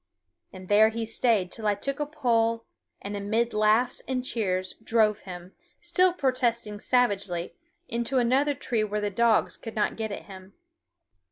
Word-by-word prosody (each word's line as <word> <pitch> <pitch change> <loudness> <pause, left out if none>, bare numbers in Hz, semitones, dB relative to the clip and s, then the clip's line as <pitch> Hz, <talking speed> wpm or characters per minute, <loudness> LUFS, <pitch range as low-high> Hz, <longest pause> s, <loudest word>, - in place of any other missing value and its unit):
And 185 -1 -11
there 215 +2 +6
he 225 0 -3
stayed 220 -4 +1
till 220 -2 -4
I 205 - +3
took 275 +8 -4
a 295 - -1
pole 230 -6 +1 0.4
and 205 +1 -5
amid 220 +4 -1
laughs 215 +4 +2
and 255 -1 -2
cheers 185 -6 -1
drove 220 -2 +2
him, 180 0 -10 0.3
still 370 -1 +3
protesting 240 -8 -1
savagely, 200 -9 0 0.3
into 235 +3 -1
another 265 +4 +2
tree 230 -3 -1
where 210 0 -2
the 205 -1 -2
dogs 230 +2 +2
could 225 - -9
not 210 - 0
get 220 -1 -3
at - - -6
him. 190 0 -12
225 Hz, 160 wpm, -27 LUFS, 205-245 Hz, 0.4 s, there